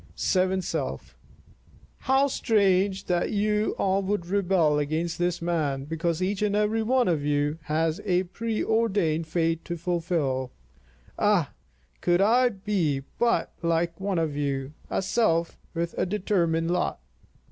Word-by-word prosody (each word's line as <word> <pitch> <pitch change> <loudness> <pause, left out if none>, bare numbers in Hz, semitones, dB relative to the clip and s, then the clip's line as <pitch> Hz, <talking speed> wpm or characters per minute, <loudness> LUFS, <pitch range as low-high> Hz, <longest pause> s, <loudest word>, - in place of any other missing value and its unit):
Seventh 185 0 +1
Self: - - -4 0.8
How 270 +1 +3
strange 200 -6 +2
that 175 -1 0
you 210 0 0
all 195 0 +1
would 195 -2 -2
rebel 175 -5 +2
against 160 +4 -2
this 175 -1 -1
man, 150 -6 -1
because 165 +2 -1
each 195 +2 -1
and 205 -1 +1
every 210 +2 +1
one 250 +2 +2
of 160 -5 +1
you 145 +1 0
has 160 +1 0
a 185 -2 +2
preordained 210 -5 0
fate 165 0 0
to 170 - -4
fulfil. 160 -7 -1 0.7
Ah! 200 -9 +2 0.5
could 175 0 +2
I 240 +5 +4
but 200 -4 -14
be 160 -10 0 0.6
like 170 +1 0
one 195 -2 -1
of 160 -3 -1
you, 140 -1 -2 0.2
a - - -1
self 170 -6 +1 0.2
with 170 0 -2
a - - +1
determined 175 -4 0
lot! 180 - -1
175 Hz, 135 wpm, -26 LUFS, 160-205 Hz, 0.8 s, I